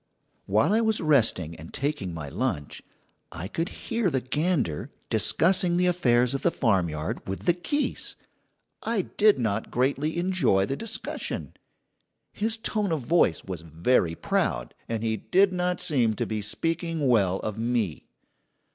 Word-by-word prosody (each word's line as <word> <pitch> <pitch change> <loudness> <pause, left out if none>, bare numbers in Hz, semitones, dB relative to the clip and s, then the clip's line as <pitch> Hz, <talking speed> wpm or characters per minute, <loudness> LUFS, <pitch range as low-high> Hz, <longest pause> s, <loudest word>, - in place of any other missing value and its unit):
While 110 - +3
I 225 - +4
was 220 -1 +1
resting 115 - +2
and 80 +1 -10
taking 140 -10 -2
my 80 -3 -6
lunch, 85 - -3 0.5
I 90 - -5
could 165 - -2
hear 230 -4 -1
the 135 - 0
gander 130 - -1 0.2
discussing 180 0 +3
the 180 - +3
affairs 125 -8 +3
of 135 - -2
the - - +3
farmyard 85 - -1
with 95 0 -4
the 175 - +5
geese. 290 - -2 0.7
I 225 -3 0
did 210 +3 +3
not 110 -3 -1
greatly 140 +6 0
enjoy 175 - +2
the 135 - -2
discussion. 225 +7 -4 0.8
His 220 +1 0
tone 215 -4 -1
of 160 -3 0
voice 125 - +2
was 90 -4 -6
very 85 - +1
proud, - - -1 0.2
and 115 -1 -2
he 110 -1 0
did 190 - +3
not 180 0 0
seem 125 -10 +1
to - - -1
be 110 -1 -3
speaking 165 - -1
well 100 -7 +3
of 110 0 -4
me. 115 -8 -1
130 Hz, 150 wpm, -26 LUFS, -, 0.8 s, the